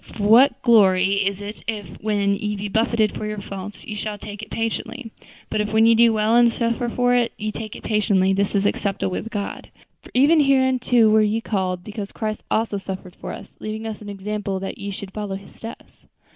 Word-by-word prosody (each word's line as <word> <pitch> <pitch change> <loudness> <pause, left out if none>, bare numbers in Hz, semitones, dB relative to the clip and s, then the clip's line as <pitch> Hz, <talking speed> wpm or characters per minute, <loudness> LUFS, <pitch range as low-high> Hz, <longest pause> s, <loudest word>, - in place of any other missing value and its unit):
For 210 - -4
what 235 +7 +6
glory 195 -4 +4
is 200 0 -2
it 205 +1 -8
if, 210 -3 -5
when 205 -2 +1
ye 210 +1 -2
be 205 +1 -4
buffeted 220 0 +2
for 210 - -4
your 210 0 -4
faults, 195 +1 -8
ye 215 - -5
shall 210 0 -4
take 205 +1 -8
it 220 - -9
patiently? 225 +1 -3 0.4
but 210 - -1
if 210 - -2
when 220 +1 +4
ye 230 - +6
do 230 0 +5
well, 220 +1 +2
and 240 -1 +6
suffer 235 +1 -1
for 245 +1 +2
it, 245 -1 +2
ye 215 0 -3
take 215 0 -7
it - - -10
patiently, 200 -3 +2
this 200 +1 0
is 200 0 +2
acceptable 200 -2 -1
with 225 - -4
God. 205 -3 -5 0.3
For - - -15
even 290 +5 +5
hereunto 260 -4 +4
were 215 0 +5
ye 215 +1 +1
called; 185 -5 -2
because 205 0 -6
Christ 215 -1 -4
also 220 -2 0
suffered 190 -2 -7
for - - -7
us, - - -9
leaving 215 +1 -5
us 220 -1 -5
an 205 - -8
example 200 0 -3
that 195 - -6
ye 200 - -5
should 195 -1 -7
follow 205 -2 -4
His 195 +1 -11
steps." 225 +1 -11
210 Hz, 215 wpm, -22 LUFS, 200-225 Hz, 0.4 s, what